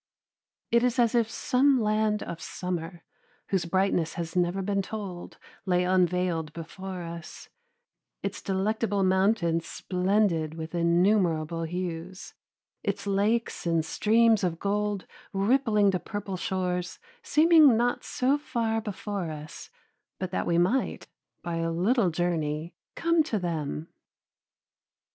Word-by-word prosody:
It 235 Hz, -, +5 dB
is 250 Hz, 0 st, +1 dB
as 235 Hz, -1 st, +3 dB
if 230 Hz, -2 st, +2 dB
some 260 Hz, +3 st, +2 dB
land 215 Hz, -1 st, +1 dB
of 170 Hz, -1 st, -7 dB
summer 175 Hz, -1 st, -5 dB, 0.5 s
whose 190 Hz, -3 st, +1 dB
brightness 180 Hz, -2 st, +1 dB
has 165 Hz, -1 st, -5 dB
never 180 Hz, +2 st, +1 dB
been 200 Hz, 0 st, 0 dB
told 195 Hz, -3 st, -7 dB, 0.3 s
lay 180 Hz, -2 st, +2 dB
unveiled 180 Hz, -3 st, +1 dB
before 180 Hz, +2 st, -7 dB
us, 170 Hz, 0 st, -9 dB, 0.7 s
its -, -, -3 dB
delectable 200 Hz, +1 st, 0 dB
mountains 190 Hz, -3 st, +2 dB
splendid 180 Hz, -4 st, 0 dB
with 160 Hz, 0 st, -7 dB
innumerable 170 Hz, -2 st, +2 dB
hues, 175 Hz, +1 st, -5 dB, 0.5 s
its -, -, -3 dB
lakes 205 Hz, +1 st, 0 dB
and 165 Hz, -2 st, +1 dB
streams 220 Hz, +4 st, +3 dB
of 170 Hz, -2 st, 0 dB
gold 205 Hz, +1 st, -1 dB, 0.3 s
rippling 210 Hz, 0 st, +3 dB
to 185 Hz, -, -1 dB
purple 205 Hz, -1 st, -5 dB
shores 180 Hz, -1 st, -2 dB, 0.2 s
seeming 310 Hz, -5 st, +6 dB
not 245 Hz, +1 st, 0 dB
so 270 Hz, +3 st, +1 dB
far 230 Hz, -5 st, -1 dB
before 205 Hz, -4 st, -4 dB
us 150 Hz, 0 st, -8 dB, 0.5 s
but 185 Hz, -2 st, -4 dB
that -, -, -2 dB
we 170 Hz, -, +2 dB
might, 190 Hz, +10 st, +1 dB, 0.4 s
by 170 Hz, -1 st, -3 dB
a 165 Hz, 0 st, -1 dB
little 190 Hz, +5 st, +2 dB
journey, 160 Hz, -1 st, -2 dB, 0.2 s
come 335 Hz, 0 st, +3 dB
to 295 Hz, -8 st, -1 dB
them. 155 Hz, -, -3 dB
185 Hz, 125 wpm, -27 LUFS, 170-215 Hz, 0.7 s, seeming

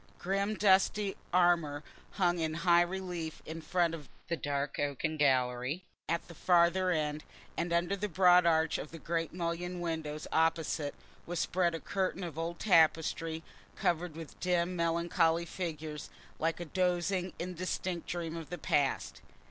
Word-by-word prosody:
Grim 195 Hz, +3 st, -1 dB
dusty 195 Hz, 0 st, +3 dB, 0.2 s
armour 170 Hz, -5 st, +3 dB, 0.3 s
hung 175 Hz, -3 st, +2 dB
in 160 Hz, -1 st, -1 dB
high 175 Hz, -1 st, +6 dB
relief 175 Hz, -3 st, -3 dB
in 165 Hz, +1 st, -6 dB
front 170 Hz, +1 st, +1 dB
of 150 Hz, -4 st, -8 dB, 0.2 s
the 170 Hz, -, +1 dB
dark 145 Hz, -2 st, -2 dB
oaken 145 Hz, +2 st, -1 dB
gallery 130 Hz, +2 st, +1 dB, 0.3 s
at 170 Hz, +1 st, -1 dB
the 170 Hz, -, -10 dB
farther 175 Hz, +2 st, +3 dB
end, 150 Hz, -3 st, -1 dB, 0.3 s
and 170 Hz, 0 st, -2 dB
under 170 Hz, +3 st, +1 dB
the 210 Hz, +1 st, -3 dB
broad 180 Hz, 0 st, +6 dB
arch 160 Hz, -1 st, +2 dB
of 150 Hz, -, -6 dB
the 165 Hz, -, -9 dB
great 165 Hz, -1 st, -2 dB
mullioned 175 Hz, +1 st, -3 dB
window 160 Hz, -3 st, -3 dB, 0.2 s
opposite 160 Hz, -2 st, +1 dB, 0.3 s
was 175 Hz, +1 st, -3 dB
spread 175 Hz, -2 st, +1 dB
a -, -, -4 dB
curtain 190 Hz, 0 st, -2 dB
of 165 Hz, -3 st, -5 dB
old 170 Hz, +1 st, -3 dB
tapestry, 165 Hz, -3 st, +2 dB, 0.3 s
covered 170 Hz, -1 st, 0 dB
with 165 Hz, -2 st, -9 dB
dim 180 Hz, 0 st, +1 dB
melancholy 170 Hz, 0 st, +2 dB
figures, 155 Hz, -4 st, -5 dB, 0.3 s
like 165 Hz, +1 st, 0 dB
a 175 Hz, -, -4 dB
dozing 180 Hz, +1 st, 0 dB
indistinct 180 Hz, 0 st, -3 dB
dream 170 Hz, -2 st, -3 dB
of 165 Hz, -2 st, -7 dB
the 175 Hz, -, -4 dB
past. 140 Hz, -5 st, 0 dB
170 Hz, 150 wpm, -32 LUFS, 160-180 Hz, 0.3 s, high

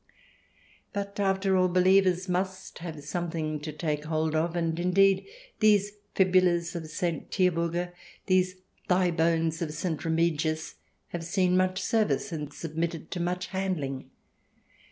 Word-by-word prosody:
But 200 Hz, 0 st, -4 dB
after 195 Hz, -1 st, +2 dB
all, 185 Hz, 0 st, +4 dB
believers 185 Hz, 0 st, +3 dB
must 185 Hz, +1 st, -3 dB
have 160 Hz, -3 st, -7 dB
something 160 Hz, -1 st, -3 dB
to 155 Hz, +1 st, -5 dB
take 150 Hz, -1 st, -2 dB
hold 155 Hz, 0 st, 0 dB
of, 165 Hz, +2 st, 0 dB
and, 165 Hz, -1 st, 0 dB
indeed, 190 Hz, -, +3 dB, 0.3 s
these 210 Hz, -2 st, +4 dB, 0.2 s
fibulas 180 Hz, -2 st, +3 dB
of 165 Hz, -2 st, -4 dB
St. 165 Hz, +1 st, -3 dB
Tiburga, 175 Hz, -1 st, 0 dB, 0.3 s
these 185 Hz, -1 st, +2 dB, 0.3 s
thigh 180 Hz, -1 st, +3 dB
bones 165 Hz, 0 st, +1 dB
of 155 Hz, -3 st, -2 dB
St. 160 Hz, -1 st, -2 dB
Remigius, 160 Hz, -1 st, 0 dB, 0.4 s
have 170 Hz, -1 st, -5 dB
seen 180 Hz, +1 st, +2 dB
much 185 Hz, 0 st, +2 dB
service 215 Hz, 0 st, +1 dB
and 150 Hz, -3 st, -4 dB
submitted 165 Hz, +1 st, -4 dB
to 180 Hz, -, -3 dB
much 180 Hz, +1 st, -1 dB
handling. 175 Hz, -9 st, -3 dB
175 Hz, 135 wpm, -28 LUFS, 160-185 Hz, 0.4 s, all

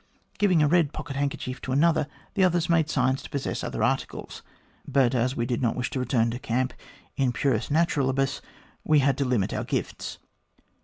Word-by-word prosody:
Giving 185 Hz, -6 st, +4 dB
a -, -, +4 dB
red 160 Hz, -2 st, +3 dB
pocket 145 Hz, -3 st, -6 dB
handkerchief 140 Hz, -2 st, -3 dB
to 130 Hz, -, -5 dB
another, 155 Hz, +2 st, +3 dB, 0.3 s
the 195 Hz, -, +2 dB
others 175 Hz, -2 st, +2 dB
made 165 Hz, -2 st, +2 dB
signs 130 Hz, -1 st, +1 dB
to -, -, -10 dB
possess 140 Hz, -1 st, -3 dB
other -, -, -2 dB
articles; -, -, -2 dB, 0.5 s
but 135 Hz, -2 st, +3 dB
as 125 Hz, +1 st, +1 dB
we 120 Hz, -, -1 dB
did 120 Hz, 0 st, -1 dB
not 120 Hz, -3 st, +1 dB
wish 125 Hz, -1 st, -2 dB
to 135 Hz, -, -2 dB
return 120 Hz, -2 st, +1 dB
to 120 Hz, -, -5 dB
camp 130 Hz, 0 st, -1 dB, 0.4 s
in 135 Hz, -2 st, +2 dB
puris 120 Hz, -2 st, 0 dB
naturalibtis, 140 Hz, -4 st, +1 dB, 0.4 s
we 155 Hz, -, +4 dB
had 140 Hz, -2 st, +3 dB
to 140 Hz, -, +1 dB
limit 120 Hz, -7 st, 0 dB
our -, -, -2 dB
gifts. -, -, -3 dB
135 Hz, 190 wpm, -26 LUFS, 125-155 Hz, 0.5 s, Giving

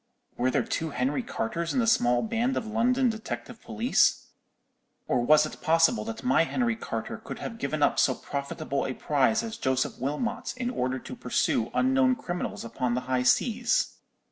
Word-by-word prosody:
Were 125 Hz, +1 st, +1 dB
there -, -, +1 dB
two 160 Hz, -, -2 dB
Henry 135 Hz, 0 st, -1 dB
Carters 165 Hz, -, -3 dB
in -, -, +3 dB
the 235 Hz, -, +2 dB
small 120 Hz, -, +3 dB
band 230 Hz, +4 st, 0 dB
of -, -, -2 dB
London 245 Hz, +4 st, +2 dB
detective 225 Hz, +1 st, -5 dB
police? 230 Hz, +3 st, +1 dB, 0.8 s
or 120 Hz, -, +1 dB
was 150 Hz, +5 st, +5 dB
it 155 Hz, -, -9 dB
possible 165 Hz, -8 st, +3 dB
that 115 Hz, 0 st, -6 dB
my 130 Hz, +5 st, +4 dB
Henry 235 Hz, +6 st, 0 dB
Carter 225 Hz, -, -5 dB
could -, -, -8 dB
have 230 Hz, -1 st, -7 dB
given 155 Hz, -8 st, -1 dB
up -, -, +3 dB
so -, -, +3 dB
profitable 140 Hz, 0 st, -3 dB
a 130 Hz, -, -4 dB
prize 150 Hz, -, +1 dB
as 225 Hz, 0 st, -5 dB
Joseph 130 Hz, 0 st, -1 dB
Wilmot 150 Hz, -, -3 dB
in 250 Hz, -1 st, -2 dB
order 130 Hz, -, -1 dB
to -, -, -8 dB
pursue 115 Hz, -, 0 dB
unknown 260 Hz, 0 st, +3 dB
criminals 175 Hz, -, -4 dB
upon 120 Hz, +1 st, -2 dB
the 125 Hz, -, -1 dB
high 125 Hz, 0 st, 0 dB
seas? 230 Hz, -, +2 dB
165 Hz, 175 wpm, -27 LUFS, -, 0.8 s, was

